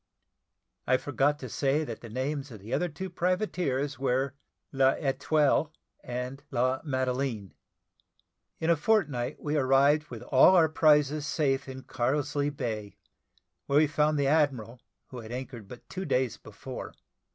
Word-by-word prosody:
I 130 Hz, -, +4 dB
forgot 145 Hz, +2 st, 0 dB
to 130 Hz, -, -7 dB
say 140 Hz, +5 st, 0 dB
that 115 Hz, -7 st, -7 dB
the 115 Hz, -, -9 dB
names 135 Hz, +4 st, -3 dB
of 110 Hz, -4 st, -10 dB
the 110 Hz, +6 st, -7 dB
other 180 Hz, -, 0 dB
two 190 Hz, +5 st, -6 dB
privateers 175 Hz, -7 st, -1 dB
were 135 Hz, 0 st, 0 dB, 0.4 s
L'Etoille 140 Hz, +2 st, +2 dB, 0.3 s
and 125 Hz, +2 st, -5 dB
La 130 Hz, +1 st, 0 dB
Madeleine. 130 Hz, -, -2 dB, 1.1 s
In 160 Hz, +1 st, +2 dB
a -, -, +5 dB
fortnight 150 Hz, -, 0 dB
we 150 Hz, 0 st, -1 dB
arrived 140 Hz, +2 st, +3 dB
with -, -, -8 dB
all 135 Hz, +7 st, +6 dB
our 165 Hz, -3 st, +5 dB
prizes 150 Hz, -1 st, +3 dB
safe 140 Hz, -3 st, 0 dB
in 130 Hz, 0 st, -8 dB
Carlisle 145 Hz, +4 st, -1 dB
Bay, 115 Hz, -8 st, -5 dB, 0.7 s
where 140 Hz, -, +2 dB
we 155 Hz, -, +6 dB
found 150 Hz, 0 st, +1 dB
the 140 Hz, -, +1 dB
admiral, 135 Hz, -6 st, +1 dB, 0.3 s
who 125 Hz, -, -8 dB
had 110 Hz, -1 st, -9 dB
anchored 125 Hz, -4 st, -7 dB
but 120 Hz, +4 st, -12 dB
two 190 Hz, 0 st, -5 dB
days 125 Hz, -, 0 dB
before. -, -, -9 dB
135 Hz, 145 wpm, -28 LUFS, 130-150 Hz, 1.1 s, all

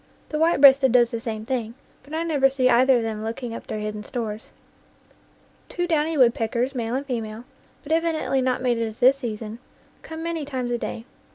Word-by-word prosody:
The 305 Hz, -, -2 dB
white 330 Hz, 0 st, +3 dB
breasted 270 Hz, -2 st, +7 dB
does 240 Hz, -1 st, +4 dB
the 230 Hz, -, -3 dB
same 220 Hz, -1 st, -5 dB
thing, 235 Hz, -2 st, -3 dB, 0.3 s
but 280 Hz, -, -18 dB
I 325 Hz, -, -1 dB
never 290 Hz, -5 st, +3 dB
see 260 Hz, -1 st, +1 dB
either 255 Hz, +2 st, +5 dB
of 235 Hz, -, -1 dB
them 220 Hz, -1 st, -4 dB
looking 230 Hz, +1 st, -5 dB
up -, -, -8 dB
their -, -, -4 dB
hidden 210 Hz, 0 st, -4 dB
stores. 220 Hz, -2 st, -5 dB, 1.2 s
Two 350 Hz, -, -2 dB
downy 320 Hz, -2 st, 0 dB
woodpeckers, 245 Hz, 0 st, +2 dB
male 235 Hz, -2 st, -2 dB
and 275 Hz, +2 st, -2 dB
female, 225 Hz, -3 st, -4 dB, 0.4 s
but 290 Hz, -, -8 dB
evidently 320 Hz, -4 st, +1 dB
not 255 Hz, 0 st, 0 dB
mated 235 Hz, -2 st, +1 dB
at 220 Hz, 0 st, -9 dB
this 260 Hz, +2 st, +5 dB
season, 225 Hz, -3 st, -6 dB, 0.4 s
come 320 Hz, 0 st, -8 dB
many 335 Hz, -2 st, -3 dB
times 260 Hz, -4 st, -4 dB
a 240 Hz, -, -1 dB
day. 230 Hz, -, -5 dB
250 Hz, 195 wpm, -24 LUFS, 225-280 Hz, 1.2 s, breasted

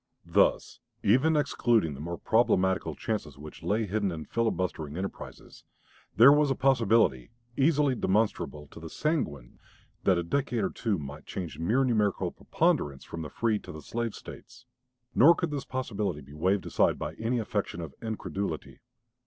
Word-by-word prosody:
Thus, -, -, +2 dB, 0.2 s
even 140 Hz, +9 st, +4 dB
excluding 120 Hz, -, +2 dB
the 70 Hz, -, -9 dB
more 85 Hz, +3 st, -5 dB
problematical 95 Hz, -4 st, +2 dB
chances 85 Hz, -11 st, -4 dB
which 75 Hz, +1 st, -11 dB
lay 110 Hz, +2 st, 0 dB
hidden 100 Hz, -1 st, -1 dB
in 80 Hz, -2 st, -6 dB
filibustering 90 Hz, -9 st, -2 dB
enterprises, 95 Hz, +1 st, -7 dB, 0.5 s
there 120 Hz, +6 st, +9 dB
was 150 Hz, -1 st, +3 dB
a 135 Hz, -, +1 dB
possibility, 115 Hz, -, +2 dB, 0.3 s
easily 145 Hz, -1 st, +3 dB
demonstrable 100 Hz, -9 st, 0 dB
to -, -, -12 dB
the 80 Hz, 0 st, -8 dB
sanguine, 75 Hz, -, -2 dB, 0.4 s
that 95 Hz, -2 st, +4 dB
a 85 Hz, -, 0 dB
decade 120 Hz, +3 st, -1 dB
or -, -, 0 dB
two 110 Hz, -5 st, -1 dB
might 70 Hz, -1 st, -8 dB
change 90 Hz, -4 st, -6 dB
mere 110 Hz, +11 st, +2 dB
numerical 110 Hz, -6 st, +1 dB
preponderance 70 Hz, -2 st, 0 dB
from 85 Hz, -, -7 dB
the 75 Hz, -, -6 dB
free 110 Hz, +6 st, 0 dB
to -, -, -10 dB
the 80 Hz, -1 st, -10 dB
slave 115 Hz, +3 st, -3 dB
States. -, -, -12 dB, 0.5 s
Nor 165 Hz, +7 st, +7 dB
could 170 Hz, -3 st, -2 dB
this 140 Hz, -2 st, -4 dB
possibility 105 Hz, -, -3 dB
be 70 Hz, +1 st, -14 dB
waved 95 Hz, +5 st, 0 dB
aside -, -, +2 dB
by 75 Hz, -, -4 dB
any 115 Hz, +2 st, 0 dB
affectation 105 Hz, -5 st, -3 dB
of 80 Hz, -5 st, -6 dB
incredulity. 100 Hz, -6 st, -4 dB
105 Hz, 160 wpm, -28 LUFS, 80-120 Hz, 0.5 s, there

